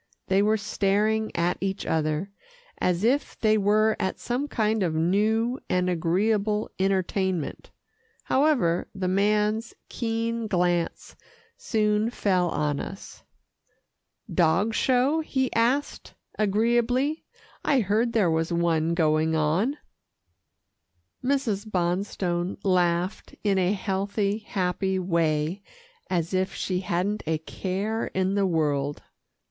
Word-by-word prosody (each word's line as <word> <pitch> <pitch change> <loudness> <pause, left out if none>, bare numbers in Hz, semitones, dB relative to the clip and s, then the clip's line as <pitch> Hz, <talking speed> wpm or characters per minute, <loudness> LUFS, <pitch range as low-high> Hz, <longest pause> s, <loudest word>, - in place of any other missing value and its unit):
They 195 +1 +4
were 215 +1 +3
staring 215 +1 +1
at 170 +1 0
each 195 +1 -2
other, 155 +4 -1 0.5
as 180 +1 0
if 265 +6 +1
they 215 -1 +3
were 215 +1 +3
at 190 - -1
some 250 +4 -2
kind 220 -4 0
of 170 -4 0
new 215 - +1
and 180 0 +1
agreeable 205 +5 0
entertainment. 190 -3 -1 0.5
However, 260 - +2
the 190 -1 -2
man's 210 +4 +1
keen 230 -1 -2
glance 175 -3 -1 0.4
soon 215 0 +1
fell 185 -6 +1
on 150 -2 -1
us. 195 - -8 1.1
"Dog 180 +6 +2
show?" 260 +7 +2
he 265 -5 -1
asked 250 +5 0 0.2
agreeably. 240 +8 +1 0.4
"I 275 -4 +3
heard 220 +4 +1
there 200 -7 +3
was 160 +1 0
one 170 -1 +1
going 160 -1 +2
on." 170 - +1 1.5
Mrs. 240 -6 0
Bonstone 180 -1 -1
laughed 180 -1 0
in 200 -2 +2
a 185 +2 +2
healthy, 200 +1 -1
happy 190 -2 -1
way, 170 -1 0 0.5
as 170 -1 -1
if 185 +1 0
she 185 -1 -1
hadn't 185 +3 -1
a 160 0 +1
care 195 +7 -3
in 190 +1 +1
the 200 -1 +2
world. 145 -4 0
195 Hz, 115 wpm, -26 LUFS, 175-220 Hz, 1.5 s, They